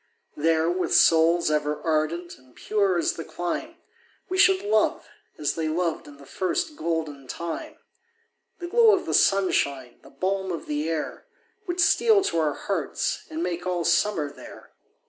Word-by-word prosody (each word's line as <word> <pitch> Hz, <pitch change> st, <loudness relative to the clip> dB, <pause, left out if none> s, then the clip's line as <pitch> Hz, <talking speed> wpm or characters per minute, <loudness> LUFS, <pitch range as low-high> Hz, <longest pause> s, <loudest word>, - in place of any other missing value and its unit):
There, 160 Hz, +1 st, +2 dB
with 180 Hz, +2 st, 0 dB
souls 165 Hz, 0 st, +4 dB
ever 150 Hz, 0 st, 0 dB
ardent 165 Hz, +2 st, -1 dB
and 130 Hz, -1 st, -24 dB
pure 200 Hz, -4 st, 0 dB
as 170 Hz, -, +1 dB
the 165 Hz, -, -6 dB
clime, 175 Hz, +1 st, -4 dB, 0.5 s
We 370 Hz, -, -2 dB
should 385 Hz, 0 st, +5 dB
love, 415 Hz, -, +1 dB, 0.3 s
as 150 Hz, -, -1 dB
they 160 Hz, -1 st, -2 dB
loved 165 Hz, 0 st, -2 dB
in 145 Hz, -1 st, -13 dB
the 140 Hz, -, -15 dB
first 315 Hz, -, -2 dB
golden 160 Hz, -, -3 dB
time; 170 Hz, +5 st, -6 dB, 0.8 s
The 350 Hz, -, -7 dB
glow 450 Hz, +2 st, +5 dB
of 375 Hz, -, -4 dB
the -, -, -3 dB
sunshine, 140 Hz, -10 st, +1 dB
the -, -, -16 dB
balm 190 Hz, +5 st, -2 dB
of 170 Hz, -, -5 dB
the 150 Hz, +2 st, -2 dB
air, 160 Hz, -2 st, -4 dB, 0.4 s
Would 350 Hz, 0 st, -3 dB
steal 410 Hz, +4 st, +4 dB
to 165 Hz, -, 0 dB
our 150 Hz, -2 st, 0 dB
hearts, -, -, -3 dB
and 320 Hz, +1 st, -4 dB
make 175 Hz, +1 st, -3 dB
all 175 Hz, -2 st, -1 dB
summer 170 Hz, -4 st, +1 dB
there. -, -, -13 dB
170 Hz, 165 wpm, -25 LUFS, 155-200 Hz, 0.8 s, should